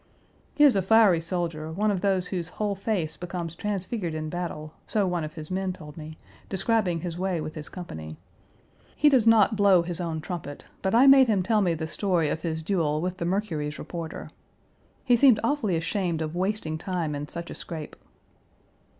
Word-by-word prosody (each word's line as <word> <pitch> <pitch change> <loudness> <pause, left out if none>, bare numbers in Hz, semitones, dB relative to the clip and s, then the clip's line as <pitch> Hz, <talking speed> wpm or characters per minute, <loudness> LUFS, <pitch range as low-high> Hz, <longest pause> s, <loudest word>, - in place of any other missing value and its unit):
He 295 - +4
is 280 -6 +7
a 195 - +3
fiery 195 -3 +5
soldier, 165 -2 -3
one 210 +5 +1
of 190 -3 -2
those 190 -3 +1
whose 175 -4 -2
whole 210 -1 0
face 195 -5 -2
becomes 175 -2 -5
transfigured 190 -2 -3
in 155 0 -4
battle, 160 -3 -5
so 210 -2 +1
one 175 -3 -1
of 155 +1 -7
his 155 +1 -8
men 190 0 -1
told 150 -4 -11
me, 155 0 -9 0.3
describing 190 -3 0
his 175 0 -5
way 185 -2 -1
with 155 0 -5
his 150 -1 -7
company. 80 - -8 0.8
He 300 - +5
does 255 -5 +3
not 220 -1 +5
blow 200 -4 +5
his 175 0 -3
own 165 -2 -3
trumpet, 155 -4 -7 0.2
but 190 +3 0
I 250 +3 +7
made 270 -1 +8
him 205 -5 +2
tell 215 +2 +2
me 175 -4 +1
the 160 0 -4
story 170 -2 0
of 160 - -2
his 160 -1 -3
duel 160 -4 0
with 180 +2 -3
the 170 - -3
Mercury's 165 -6 -2
reporter. 165 -2 -7 0.7
He 245 - +5
seemed 240 -3 +6
awfully 255 -11 +1
ashamed 170 -1 -1
of 155 +1 -5
wasting 180 -4 -2
time 170 -4 -2
in 145 0 -4
such 170 +2 -7
a - - -5
scrape. 160 -3 -6
175 Hz, 195 wpm, -26 LUFS, 160-200 Hz, 0.8 s, made